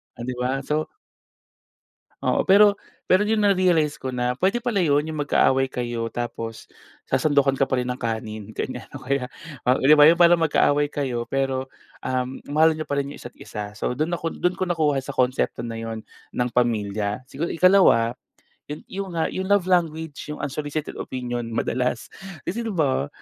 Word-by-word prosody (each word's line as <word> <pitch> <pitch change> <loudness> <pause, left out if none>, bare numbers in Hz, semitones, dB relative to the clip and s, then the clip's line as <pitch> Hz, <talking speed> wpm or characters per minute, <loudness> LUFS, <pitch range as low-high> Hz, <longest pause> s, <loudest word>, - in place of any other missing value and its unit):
o - - -22
'di 125 +1 -3
ba? 130 +2 -1
So 150 +3 -1 1.3
Oo, - - +1
pero 200 +1 +6 0.3
pero 185 +3 +4
yun 220 0 +2
na-realize 180 -6 +3
ko 130 - -4
na 125 0 0
pwede 195 +6 +2
pala 235 -5 0
yun, 145 -1 +3
yung 155 -1 -4
magkaaway 135 -2 +3
kayo, 120 -2 -3
tapos 115 -2 -5 0.4
sasandukan 140 -3 +2
ka 135 - +3
pa 130 - +1
rin 125 - -3
ng 125 0 -4
kanin, 110 -2 -4
ganyan. - - -4
O - - -8
kaya, 135 -2 -1 0.4
o 125 +1 +4
'di 145 +3 +7
ba, 145 - +8
yung 170 +2 +4
parang 170 0 +6
magkaaway 145 -1 +3
kayo, 125 -5 -2
pero 135 -1 -1 0.4
um, 130 0 -2 0.2
mahal 160 +2 +5
niyo 155 - -4
pa 145 - -1
rin 140 - -4
yung - - -11
isa't 120 - -10
isa. 105 -1 -7
So, - - -2
do'n 155 +5 -1
ako, 165 +1 -3
do'n 180 0 +1
ko - - +1
nakuha 155 -5 +1
sa 135 +2 -7
konsepto 125 -1 +1
na 115 -1 -5
'yun 115 -1 -5 0.3
ng 125 0 0
pamilya. 105 -3 0
Sigu 155 +6 -3
ikalawa, 180 -11 +5 0.6
yun 150 +1 -7
yun 195 0 -5
nga 160 - +1
yung 190 0 -3
love 200 -2 +3
language, 160 -5 -1
yung 150 - -4
unsolicited 145 +2 -4
opinion 125 -1 -4
madalas 125 +1 -2 0.3
kasi, 210 +7 -3
'di 230 - -3
ba? 145 - 0
140 Hz, 180 wpm, -23 LUFS, 125-165 Hz, 1.3 s, ba